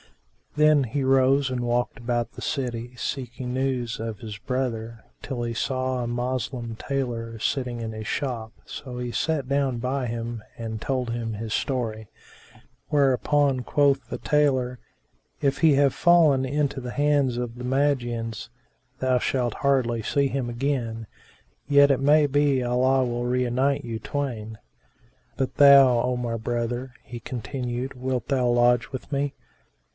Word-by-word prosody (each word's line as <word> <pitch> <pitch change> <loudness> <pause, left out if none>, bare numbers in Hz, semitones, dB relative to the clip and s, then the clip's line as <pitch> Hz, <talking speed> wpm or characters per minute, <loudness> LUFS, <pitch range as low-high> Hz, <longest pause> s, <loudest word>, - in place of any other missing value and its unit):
Then 150 -1 +5
he 135 +3 -2
rose 135 +1 +3
and 125 -1 -2
walked 120 +2 0
about 120 -1 -2
the - - -10
city, 120 -3 -3
seeking 125 -1 -4
news 130 -3 -1
of 115 -2 -4
his 105 -1 -7
brother, 115 -2 -3 0.2
till 125 -3 -4
he 120 0 -2
saw 130 +2 -1
a - - -3
Moslem 120 -1 -3
tailor 115 -3 -3
sitting 125 +1 -1
in 115 -1 -4
his 110 0 -6
shop 120 -5 -3
so 130 -4 -8
he 125 -1 -3
sat 150 -4 -1
down 140 -2 +1
by 130 +2 -2
him 115 -1 -4
and 110 -2 -5
told 130 -3 -1
him 115 -1 -3
his 110 +1 -4
story; 110 -5 -2 0.8
whereupon 140 -1 +2
quoth 140 -2 +2
the - - -4
tailor, 130 -4 +1 0.6
"If 140 -1 0
he 160 -4 +5
have 140 -1 +4
fallen 160 -6 +4
into 140 0 -1
the 125 0 -5
hands 145 -4 +2
of 120 -1 -3
the 125 - -8
Magians, 120 -5 -1 0.5
thou 130 -1 +2
shalt 120 -2 0
hardly 130 -5 +1
see 140 +5 +1
him 135 -2 -2
again: 120 -3 -2 0.6
yet 140 0 +6
it 135 - +1
may 150 +2 +5
be 145 -1 +2
Allah 130 +2 +2
will 120 0 -2
reunite 125 +3 +1
you 115 -1 -4
twain. 115 -7 -4 0.8
But 135 - -2
thou, 135 -4 +7
O 125 0 0
my 120 -1 -2
brother," 120 +2 -3
he 120 - -8
continued 125 +2 -4
wilt 130 -1 -3
thou 130 -3 +1
lodge 120 0 +3
with 130 - -7
me?" 140 0 -1
125 Hz, 150 wpm, -25 LUFS, 120-135 Hz, 0.8 s, thou